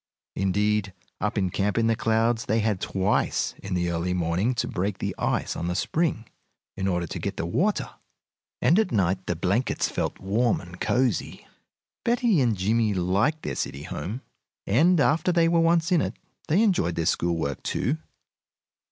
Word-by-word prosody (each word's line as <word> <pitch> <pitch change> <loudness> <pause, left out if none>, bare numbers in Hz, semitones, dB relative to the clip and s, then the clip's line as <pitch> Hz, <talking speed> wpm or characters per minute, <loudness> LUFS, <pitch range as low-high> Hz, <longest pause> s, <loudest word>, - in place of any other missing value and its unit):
Indeed, 100 +1 +1 0.3
up 105 +1 -1
in 95 -3 +1
Camp 100 +3 0
in 115 - +3
the 115 0 +3
Clouds 115 +1 +1
they 110 - +1
had 105 -3 0
twice 95 +1 0
in 95 -1 -3
the 85 -1 0
early 85 +2 -1
morning 90 +8 0
to - - -1
break 95 +1 -2
the - - -3
ice - - -1
on 85 - -3
the 90 - -1
spring 135 - -1 0.5
in 95 0 -2
order 90 -2 0
to - - -6
get - - -4
the - - -2
water, 190 - 0 0.8
and 175 - +5
at 215 -6 +1
night 95 -2 0
the 90 - 0
blankets 95 +9 0
felt - - -2
warm 110 +5 +1
and 90 0 -12
cosey. 125 -5 0 0.6
Betty 235 - +2
and 115 -5 +2
Jimmie 105 +2 +1
liked 100 - +1
their - - -3
city 70 +2 -4
home, 110 - -5 0.4
and 160 - +4
after 155 +4 +3
they 170 -1 +3
were 170 0 +3
once 165 +1 +3
in 175 -3 +4
it - - -3 0.3
they 185 +8 +3
enjoyed 130 - +1
their 80 - -1
school 85 -1 +1
work, 70 -4 -3
too. 150 +6 -1
105 Hz, 180 wpm, -26 LUFS, 90-145 Hz, 0.8 s, and